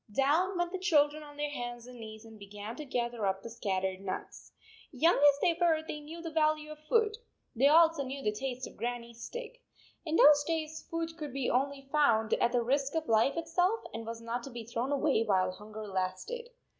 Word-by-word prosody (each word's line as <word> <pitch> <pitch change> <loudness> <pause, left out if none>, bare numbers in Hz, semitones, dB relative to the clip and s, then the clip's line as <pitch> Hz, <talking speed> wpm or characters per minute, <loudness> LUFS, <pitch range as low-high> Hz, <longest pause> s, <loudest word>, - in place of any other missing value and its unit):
Down 315 - +2
went 350 0 0
the 375 - -3
children 305 -4 +3
on 290 -1 -12
their 295 0 -2
hands 240 -3 -5
and 250 -1 -11
knees, 220 0 -9
and 220 -1 -13
began 205 +3 -8
to 300 - -6
gather 240 -5 -1
up 190 0 -1
the 230 - -7
scat 195 -4 -1
12 190 -1 -1
tered - - -14
nuts. 195 -1 -6 0.4
Young 325 +5 +3
as 285 0 +5
they 340 - +4
were, 320 -2 +3
they 300 - -4
knew 320 +3 -9
the 330 - -5
value 305 -1 +1
of 305 - -9
food. 430 +7 +1 0.4
They 265 +5 +5
also 325 0 +6
knew 270 +1 -5
the 210 - +2
taste 255 +3 -4
of - - -12
Grannie 240 0 -4
s 235 0 -15
stick. - - -7 0.4
In 315 -1 -2
those 295 -2 +7
days 315 0 -3
food 330 0 -3
could 300 -3 -5
be 270 -2 -1 0.4
found 225 -8 +3
only - - +1
at 240 - +3
the 245 -1 +2
risk 275 +4 0
of 320 -1 -1
life 225 +7 +3
itself 355 +6 +1
and 225 - -5
was 230 0 -6
not 230 +1 -3
to - - -7
be 235 -3 -7
thrown 240 +4 -2
away 285 -4 +2
while 185 -4 +2
hunger 215 +3 -9
lasted. 195 - -3
275 Hz, 220 wpm, -31 LUFS, 230-315 Hz, 0.4 s, those